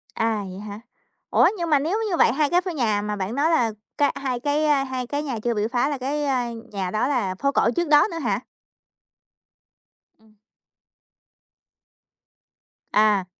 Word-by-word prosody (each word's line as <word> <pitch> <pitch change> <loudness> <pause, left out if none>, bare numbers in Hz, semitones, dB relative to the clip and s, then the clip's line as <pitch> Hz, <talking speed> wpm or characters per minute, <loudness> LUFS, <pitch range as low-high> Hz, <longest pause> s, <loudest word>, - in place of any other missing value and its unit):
À, 225 -1 0
vậy 185 - -8
hả? 205 0 -8 0.5
Ủa, - - +5
nhưng 340 -2 -2
mà 295 -2 +4
nếu 325 +9 -1
như 350 - 0
vậy - - +5
hai 295 +1 +1
cái 355 +1 +3
ph 370 - -9
nhà 220 -7 +1
mà 210 0 -3
bạn 200 +3 -4
nói 290 +4 +2
là 245 -9 +2 0.3
cái 290 - +3
hai 255 -3 -2
cái 290 0 +1
hai 260 -2 -4
cái 290 +3 -2
nhà 260 -6 -3
chưa 240 - +1
bị 210 -1 0
phá 250 +3 +1
là 290 - -2
cái, 285 +3 -2
à, 255 -4 0 0.2
nhà 190 -3 -3
đó 215 +5 0
là 230 -10 -1
phố 275 +8 0
cổ 245 - +2
trước 345 -1 0
đó 295 +4 +5
nữa 330 - -4
hả? - - 0 1.8
Ừm. 220 -1 -25 2.6
À. 210 -3 +3
255 Hz, 180 wpm, -23 LUFS, 215-295 Hz, 2.6 s, Ủa